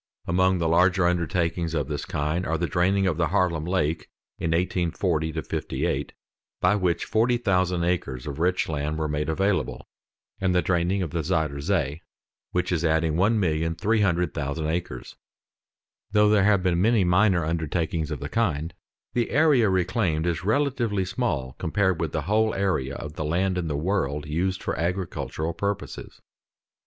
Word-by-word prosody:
Among 95 +1 +2
the 85 -2 0
larger 90 +2 +3
undertakings 85 -1 0
of 75 -4 -1
this - - -4
kind 75 +5 -1
are 80 - 0
the 85 - 0
draining 95 +2 +1
of 85 -5 0
the 85 -1 +2
Haarlem 90 -4 +1
Lake 85 -3 -1 0.3
in 85 - -1
1840 85 -1 0
58, - - -2 0.5
by 90 +3 +3
which 90 -4 0
40,000 100 -7 +1
acres 75 -8 -2
of 75 0 -5
rich 90 +2 +1
land 75 0 -2
were 80 -1 -1
made 75 +1 -2
available, 95 +4 -1 0.5
and 95 -1 +1
the 90 - +3
draining 90 +2 +1
of 80 - -4
the 85 - -1
Zuyder 80 -4 -1
Zee, 70 +2 -1 0.5
which 90 0 -1
is 85 -2 0
adding 80 -1 +2
1,300,000 85 -4 +1
acres. 85 -7 -5 1.0
Though 105 -1 +5
there 105 -2 +4
have 100 -3 +3
been 90 -2 +2
many 110 0 +4
minor 90 -1 +3
undertakings 80 0 -1
of 75 - -4
the 70 - -3
kind, 85 -5 -1 0.4
the 120 -2 0
area 145 -8 +4
reclaimed 90 -3 0
is 85 0 -1
relatively 115 -4 +1
small 70 - -2
compared 95 +1 +1
with 80 -3 -1
the 80 - -2
whole 110 +5 +1
area 90 -9 0
of 75 0 -7
the 80 - -4
land 90 +5 0
in 90 -2 -2
the 75 -2 -2
world 75 -4 -1
used 90 +5 -1
for - - -2
agricultural 85 -2 -2
purposes. 100 +2 -4
85 Hz, 155 wpm, -25 LUFS, 80-95 Hz, 1.0 s, Though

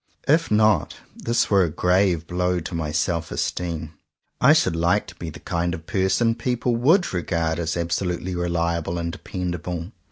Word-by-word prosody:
If 160 +3 +3
not, 105 -1 +3 0.2
this 115 -1 0
were 100 -2 +5
a 85 - 0
grave 90 0 +2
blow 90 +1 0
to 85 - -7
my 80 -3 -2
self 85 +1 -1
esteem. 80 -3 -3 0.5
I - - +7
should - - +3
like 85 +5 +2
to 85 - -12
be 85 -1 -6
the 75 - -10
kind 85 -1 -1
of 80 - -11
person 105 +5 +2
people 120 +1 -1
would 160 - +3
regard 85 -2 -1
as 85 0 -1
absolutely 90 +1 -2
reliable 85 -1 -1
and 85 0 -2
dependable. 90 0 -5
90 Hz, 165 wpm, -23 LUFS, 85-100 Hz, 0.5 s, I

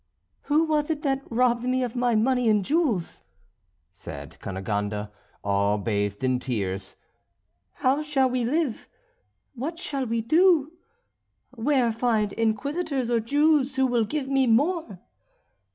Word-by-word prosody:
"Who 300 +2 +3
was 305 -1 0
it 310 -2 -2
that 270 -2 0
robbed 240 0 +2
me 255 0 +1
of 245 -1 -4
my 245 -1 +1
money 250 +1 +2
and 210 -3 +2
jewels?" 275 - 0 0.7
said 95 - -10
Cunegonde, 105 +2 -3 0.3
all 100 +1 +1
bathed 100 0 -2
in 130 -1 +1
tears. 100 -7 -3 0.8
"How 270 +3 +1
shall 295 -3 +1
we 250 -1 -1
live? 275 0 -1 0.7
What 285 +7 -5
shall 275 -6 -3
we 230 +1 -1
do? 315 +4 +3 0.8
Where 255 0 +1
find 220 -3 0
Inquisitors 260 +4 -1
or 235 - +3
Jews 285 +3 +2
who 265 0 +3
will 240 -3 +1
give 290 +3 -3
me 270 -1 +2
more?" 265 - +1
245 Hz, 135 wpm, -25 LUFS, 210-285 Hz, 0.8 s, Who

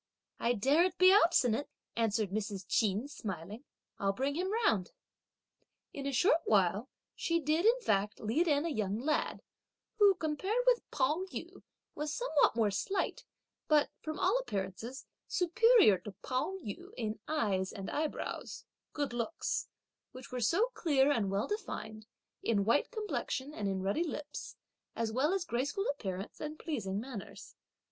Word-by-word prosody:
"I 235 - +2
daren't 305 - +3
be 370 +1 +7
obstinate," 285 - +4 0.3
answered 220 -3 +1
Mrs. 200 -2 -3
Ch'in 215 +3 +1
smiling; 205 - -6 0.3
"I'll 195 0 +1
bring 270 +6 -1
him 365 +5 -1
round!" 225 - +1 1.0
In 280 -1 -4
a - - 0
short 325 +5 +4
while 205 +4 +2 0.3
she 335 0 0
did 315 +6 +2
in 485 +2 +5
fact 205 - 0
lead 260 +12 +1
in 290 0 +2
a - - 0
young 215 -7 -1
lad, 300 +5 -1 0.6
who, 405 -2 +7
compared 375 +9 -1
with - - +4
Pao 300 +7 +1
yü, - - -7 0.3
was 300 0 -3
somewhat 315 - +2
more 220 -3 +2
slight 370 - -2 0.4
but, 300 -2 +4
from 310 +1 -4
all 385 +6 +3
appearances, 220 - -5 0.2
superior 400 - +5
to 210 - -9
Pao 260 +9 -1
yü 205 - -7
in 220 -3 -3
eyes 200 -11 0
and 195 -3 -7
eyebrows, 305 0 -3 0.3
(good 285 -4 -2
looks), 240 +7 -2 0.5
which 255 0 -10
were 250 -1 -3
so 390 - +2
clear 290 - +3
and 220 -8 +1
well 195 +1 0
defined, 220 - -5 0.3
in 205 -4 +1
white 230 +6 +3
complexion 420 - -3
and 205 -7 -3
in 190 -1 -2
ruddy 200 - +1
lips, 300 -3 -6 0.4
as 230 -1 -1
well 265 +8 +2
as 385 -2 0
graceful 285 - -1
appearance 195 -8 -6
and 305 0 -5
pleasing 210 - -3
manners. 230 -3 -8
270 Hz, 150 wpm, -33 LUFS, 210-335 Hz, 1.0 s, be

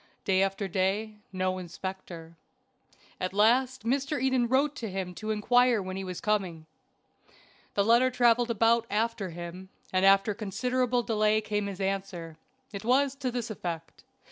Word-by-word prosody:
Day 190 -1 +3
after 195 +1 0
day 200 +4 -1
no 185 0 -1
inspector. 175 -2 -8 0.8
At 185 +1 -3
last 250 +4 +3
Mr. 275 +5 0
Eden 260 -2 +2
wrote 275 +4 +2
to 225 -5 -4
him 185 -1 -4
to 215 +4 -6
inquire 240 +2 +3
when 185 -1 -5
he 195 - -4
was 180 -2 -5
coming. 185 -7 -1 1.1
The 200 - +3
letter 235 +3 +5
traveled 240 -1 +3
about 230 +1 +2
after 215 -2 -1
him, 175 +2 -8 0.2
and 185 0 +2
after 195 +2 +5
a - - -2
considerable 245 +4 -1
delay 215 -1 +2
came 210 -1 -2
his 195 -1 -6
answer. 190 -4 -3 0.4
It 200 +1 -6
was 265 +3 +3
to 270 -2 -2
this 240 -2 -4
effect. 170 -5 -6
210 Hz, 155 wpm, -28 LUFS, 190-240 Hz, 1.1 s, letter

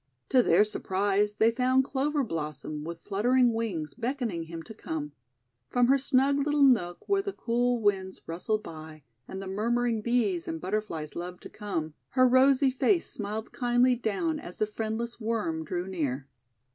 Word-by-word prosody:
To 255 - +5
their 200 -1 +4
surprise 205 0 0
they 225 +2 +4
found 255 +2 +3
Clover 280 +2 0
Blossom, 150 - -4
with 165 +1 -7
fluttering 240 +4 +3
wings, 190 -10 -3
beckoning 235 -8 -3
him 165 0 -7
to 220 - -10
come. 155 -8 -5 0.6
From 245 0 +3
her 275 +1 +5
snug 275 +1 +3
little 295 0 +2
nook, 195 -10 +3
where 395 -1 +2
the 400 0 -4
cool 245 -2 0
winds 195 -3 0
rustled 210 +6 -2
by, 155 -2 -10 0.2
and 190 - -6
the - - -7
murmuring 230 +3 0
Bees 210 -7 0
and 160 - -3
Butterflies 180 -5 -3
loved 180 +1 -6
to - - -8
come, 165 -7 -4 0.2
her 255 0 +7
rosy 265 +1 +5
face 340 +7 +1
smiled 215 +1 -5
kindly 245 +1 +3
down 255 +8 -1
as 180 - -10
the 215 - +2
friendless 220 +2 -4
Worm 215 -8 -1
drew 175 +3 -3
near. 145 -8 -2
215 Hz, 165 wpm, -28 LUFS, 175-250 Hz, 0.6 s, her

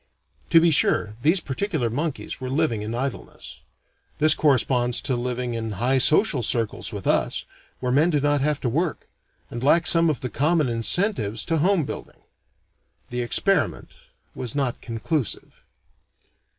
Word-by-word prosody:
To 165 - +6
be 165 0 +3
sure, 105 -7 +2
these 165 +8 +3
particular 150 - -2
monkeys 145 +5 -4
were 130 - -4
living 135 -6 0
in 110 +2 -4
idleness. 135 +1 -6 0.6
This 155 0 +6
corresponds 125 -4 +1
to 130 - -2
living 125 0 -3
in 115 -2 -4
high 125 +7 +1
social 150 - +3
circles 115 -1 0
with - - -7
us, - - 0 0.4
where 125 -1 -1
men 150 +6 +3
do 150 -4 +1
not 145 0 +1
have 150 0 0
to - - -2
work, 155 +6 -2 0.4
and 120 +1 -6
lack 165 +5 +3
some 165 -1 +6
of 145 -7 -2
the 125 - -3
common 150 +5 +1
incentives 115 - +1
to 165 - 0
home 180 +1 +2
building. - - -9 0.9
The 125 0 -2
experiment 195 +11 0 0.4
was 125 -1 -6
not 135 -4 -2
conclusive. 120 +3 -4
135 Hz, 150 wpm, -23 LUFS, 120-160 Hz, 0.9 s, To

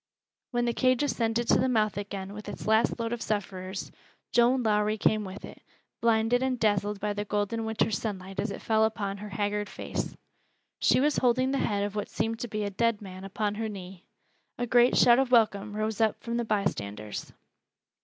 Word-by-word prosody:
When 240 -1 0
the 235 - +1
cage 255 +2 +2
ascended 235 -4 0
to - - +5
the 260 - +2
mouth 215 -4 +2
again 200 -1 -5
with 210 0 -8
its - - -7
last 220 +2 +3
load 230 0 -1
of 240 - -4
sufferers, 190 -2 -3 0.4
Joan 245 +2 +4
Lowrie 210 0 +2
came 215 0 +2
with 190 0 -7
it, - - -12 0.4
blinded 230 +1 +3
and 260 -2 0
dazzled 205 -1 +1
by 210 0 -1
the 205 0 -3
golden 210 +2 -1
winter's 220 -2 0
sunlight 195 -3 -5
as 215 - 0
it 200 - -7
fell 220 -1 +3
upon 205 -3 -1
her 210 +1 -8
haggard 205 +1 -2
face. - - -5 0.6
She - - +4
was 290 +2 +2
holding 255 +1 +2
the 275 - 0
head 200 -1 0
of 205 0 -3
what 205 -1 -3
seemed 225 +1 -2
to 240 - -3
be 215 -1 -3
a 200 - -2
dead 230 +1 +1
man 190 -2 -9
upon 205 +1 -2
her 220 - -1
knee. 190 -3 -9 0.5
A 245 - -1
great 245 +1 +4
shout 240 0 +6
of 270 -2 +1
welcome 210 -3 +3
rose 215 +1 -1
up 220 -1 +2
from 235 0 -2
the 235 - -1
bystanders. 105 - -3
215 Hz, 200 wpm, -28 LUFS, 205-235 Hz, 0.6 s, shout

